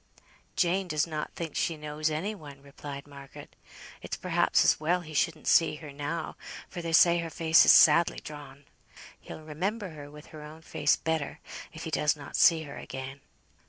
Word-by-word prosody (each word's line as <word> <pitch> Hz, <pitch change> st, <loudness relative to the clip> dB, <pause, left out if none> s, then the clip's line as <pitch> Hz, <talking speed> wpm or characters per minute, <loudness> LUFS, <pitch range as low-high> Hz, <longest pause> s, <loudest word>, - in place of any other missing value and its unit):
"Jane 185 Hz, +1 st, +1 dB
does 155 Hz, -3 st, 0 dB
not 155 Hz, -2 st, -5 dB
think 165 Hz, -3 st, -6 dB
she 165 Hz, -, -1 dB
knows 150 Hz, +1 st, -3 dB
any 165 Hz, +8 st, -3 dB
one," 145 Hz, -8 st, -12 dB
replied 140 Hz, 0 st, -9 dB
Margaret. 140 Hz, -1 st, -13 dB, 0.5 s
"It's -, -, -5 dB
perhaps -, -, +2 dB
as -, -, +3 dB
well 175 Hz, +4 st, 0 dB
he 160 Hz, -2 st, -11 dB
shouldn't 155 Hz, +1 st, -1 dB
see 165 Hz, -2 st, +4 dB
her 150 Hz, -2 st, -10 dB
now, 145 Hz, +3 st, -5 dB, 0.3 s
for 175 Hz, -, -7 dB
they 165 Hz, -1 st, -4 dB
say 170 Hz, +1 st, +5 dB
her 165 Hz, -1 st, -4 dB
face 160 Hz, 0 st, +4 dB
is -, -, +8 dB
sadly 165 Hz, +2 st, +6 dB
drawn. 145 Hz, -2 st, -11 dB, 0.5 s
He'll -, -, -10 dB
remember 190 Hz, +7 st, -3 dB
her 145 Hz, -2 st, -10 dB
with 150 Hz, +1 st, -13 dB
her 155 Hz, -, -9 dB
own 155 Hz, +2 st, -12 dB
face 145 Hz, -1 st, +1 dB
better, 160 Hz, -3 st, -3 dB, 0.3 s
if 160 Hz, -, -9 dB
he 160 Hz, -, -5 dB
does 150 Hz, -1 st, +1 dB
not 145 Hz, -2 st, -10 dB
see 165 Hz, -2 st, +5 dB
her 140 Hz, -2 st, -9 dB
again." 135 Hz, +1 st, -8 dB
155 Hz, 185 wpm, -28 LUFS, 145-165 Hz, 0.5 s, is